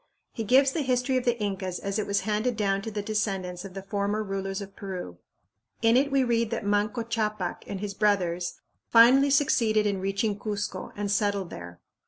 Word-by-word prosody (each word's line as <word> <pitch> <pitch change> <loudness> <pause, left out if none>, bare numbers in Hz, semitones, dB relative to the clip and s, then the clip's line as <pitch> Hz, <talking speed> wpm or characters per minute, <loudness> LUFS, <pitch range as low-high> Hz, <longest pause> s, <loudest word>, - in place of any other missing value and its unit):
He 225 - -3
gives 265 +5 +5
the 315 - -1
history 255 -1 +1
of 255 - -2
the 240 -1 +1
Incas 190 -3 -2
as 200 +1 -3
it 215 - -2
was 200 0 +1
handed 220 +2 -1
down 195 -2 +1
to 225 - -5
the 205 -1 -4
descendants 195 -4 -2
of 195 -1 -10
the 195 - -6
former 205 +2 -1
rulers 195 -1 -3
of 200 -1 -9
Peru. 180 - -7 0.6
In 225 +1 +5
it 275 +3 +3
we 275 -1 +3
read 230 -2 +1
that 230 -2 -3
Manco 205 +3 +1
Ccapac 215 -5 -2
and 195 - -5
his 205 -1 -4
brothers 185 -4 0 0.3
finally 255 +5 +7
succeeded 230 -6 +3
in 200 -2 0
reaching 200 +2 -1
Cuzco 205 -1 -4
and 205 -1 -2
settled 200 -3 0
there. 85 0 -9
205 Hz, 195 wpm, -27 LUFS, 195-230 Hz, 0.6 s, finally